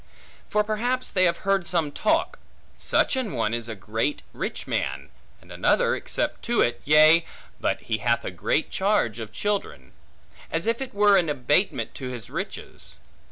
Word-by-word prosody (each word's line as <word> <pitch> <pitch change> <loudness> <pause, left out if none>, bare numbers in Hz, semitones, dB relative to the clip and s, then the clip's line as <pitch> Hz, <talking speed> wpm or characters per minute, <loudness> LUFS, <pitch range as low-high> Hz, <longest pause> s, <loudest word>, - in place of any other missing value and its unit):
For 210 - +2
perhaps 245 +4 -1
they 185 -1 +3
have 170 +1 0
heard 195 -3 +2
some 165 -5 0
talk, 325 - 0 0.4
Such - - +2
an 255 - -2
one 115 -3 0
is 120 0 -3
a 110 - -4
great 110 +8 -2
rich - - -4
man, 70 +1 -3 0.3
and - - -18
another - - +2
except - - -3
to - - +1
it, 120 - +2
Yea, 155 +3 +7 0.4
but - - -1
he 110 -1 -2
hath 120 +2 +1
a - - -3
great 90 - -1
charge 190 - +1
of 110 -2 -6
children; 120 - -3 0.6
as 165 +1 -1
if 230 +3 0
it 260 -5 -6
were 205 -1 +5
an 175 -4 +2
abatement 145 +7 0
to 130 -2 -6
his 120 -4 -8
riches. - - -6
155 Hz, 170 wpm, -25 LUFS, -, 0.6 s, Yea